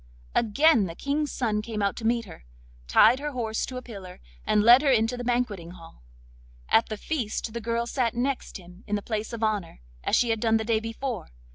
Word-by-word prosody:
Again 235 Hz, 0 st, +4 dB
the 165 Hz, -, -8 dB
King's 290 Hz, -, -1 dB
son 215 Hz, -4 st, -1 dB
came 215 Hz, -1 st, -4 dB
out 200 Hz, -, 0 dB
to 225 Hz, -, -2 dB
meet 235 Hz, 0 st, +1 dB
her, 180 Hz, -, -13 dB, 0.4 s
tied 230 Hz, -, +6 dB
her 295 Hz, 0 st, -4 dB
horse 225 Hz, -3 st, -2 dB
to 255 Hz, -, -6 dB
a 255 Hz, -, -6 dB
pillar, 195 Hz, -7 st, -10 dB, 0.3 s
and 210 Hz, -, +3 dB
led 240 Hz, +4 st, +8 dB
her 295 Hz, -, +2 dB
into 230 Hz, -1 st, +2 dB
the 245 Hz, -, -5 dB
banqueting 230 Hz, -8 st, -2 dB
hall. 165 Hz, -, -14 dB, 0.7 s
At 225 Hz, -, +4 dB
the 215 Hz, -, -4 dB
feast 225 Hz, -5 st, -3 dB
the 235 Hz, -, -4 dB
girl 230 Hz, +1 st, -1 dB
sat 240 Hz, -1 st, -1 dB
next 255 Hz, +1 st, -2 dB
him 180 Hz, +1 st, -15 dB
in 210 Hz, -, 0 dB
the 205 Hz, -, -3 dB
place 220 Hz, 0 st, -3 dB
of 230 Hz, -1 st, -5 dB
honour, 205 Hz, -, -2 dB, 0.2 s
as -, -, +2 dB
she 240 Hz, -2 st, +3 dB
had 225 Hz, -, 0 dB
done 225 Hz, 0 st, +3 dB
the 220 Hz, -, -2 dB
day 225 Hz, -1 st, +2 dB
before. 230 Hz, +1 st, -5 dB
225 Hz, 220 wpm, -26 LUFS, 210-245 Hz, 0.7 s, led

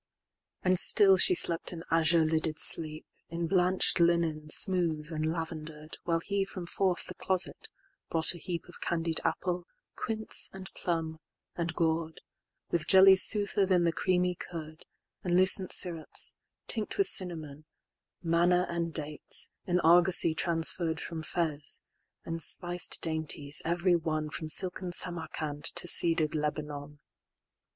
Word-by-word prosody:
XXX.And 185 Hz, -1 st, +2 dB
still 195 Hz, -2 st, +5 dB
she 180 Hz, -, +6 dB
slept 170 Hz, 0 st, +1 dB
an 165 Hz, -2 st, -9 dB
azure 165 Hz, 0 st, +3 dB
lidded 160 Hz, 0 st, -1 dB
sleep, 155 Hz, -1 st, +2 dB, 0.2 s
In 170 Hz, +1 st, -4 dB
blanched 180 Hz, +1 st, +2 dB
linen, 170 Hz, -3 st, 0 dB
smooth, 165 Hz, -3 st, +1 dB
and 155 Hz, 0 st, -2 dB
lavender'd, 160 Hz, -2 st, -7 dB
While 165 Hz, -1 st, -1 dB
he 200 Hz, +2 st, -1 dB
from 185 Hz, -2 st, -8 dB
forth 180 Hz, +1 st, -2 dB
the 185 Hz, -, -6 dB
closet 185 Hz, 0 st, 0 dB, 0.4 s
brought 165 Hz, +1 st, +3 dB
a 175 Hz, -, -11 dB
heapOf 175 Hz, +1 st, -7 dB
candied 165 Hz, -1 st, -2 dB
apple, 175 Hz, +2 st, -3 dB, 0.3 s
quince, 220 Hz, -1 st, +1 dB
and 190 Hz, 0 st, -11 dB
plum, 160 Hz, -2 st, -4 dB, 0.4 s
and 165 Hz, -2 st, -4 dB
gourd; 160 Hz, -1 st, -2 dB, 0.5 s
With 170 Hz, -2 st, -2 dB
jellies 190 Hz, 0 st, +7 dB
soother 205 Hz, -2 st, +3 dB
than 180 Hz, -2 st, +2 dB
the 170 Hz, -, +1 dB
creamy 180 Hz, +1 st, -1 dB
curd, 160 Hz, -3 st, -10 dB, 0.4 s
And 175 Hz, -1 st, -1 dB
lucent 185 Hz, 0 st, +4 dB
syrops, 165 Hz, -3 st, +1 dB, 0.3 s
tinct 220 Hz, -3 st, -2 dB
with 395 Hz, -, +2 dB
cinnamon; 155 Hz, -, +1 dB, 0.6 s
Manna 175 Hz, +2 st, +1 dB
and 170 Hz, -1 st, -3 dB
dates, 150 Hz, -1 st, -4 dB, 0.2 s
in 180 Hz, 0 st, 0 dB
argosy 170 Hz, 0 st, +4 dB
transferr'dFrom 165 Hz, -1 st, -1 dB
Fez; 155 Hz, -3 st, -3 dB, 0.4 s
and 165 Hz, 0 st, -5 dB
spiced 175 Hz, +1 st, +1 dB
dainties, 155 Hz, -3 st, -1 dB
every 175 Hz, +2 st, 0 dB
one, 155 Hz, -2 st, -3 dB
From 160 Hz, -1 st, -6 dB
silken 180 Hz, +1 st, +1 dB
Samarcand 160 Hz, -4 st, -3 dB
to -, -, -2 dB
cedar'd 165 Hz, -2 st, +2 dB
Lebanon. 150 Hz, -1 st, -5 dB
170 Hz, 130 wpm, -28 LUFS, 160-180 Hz, 0.6 s, jellies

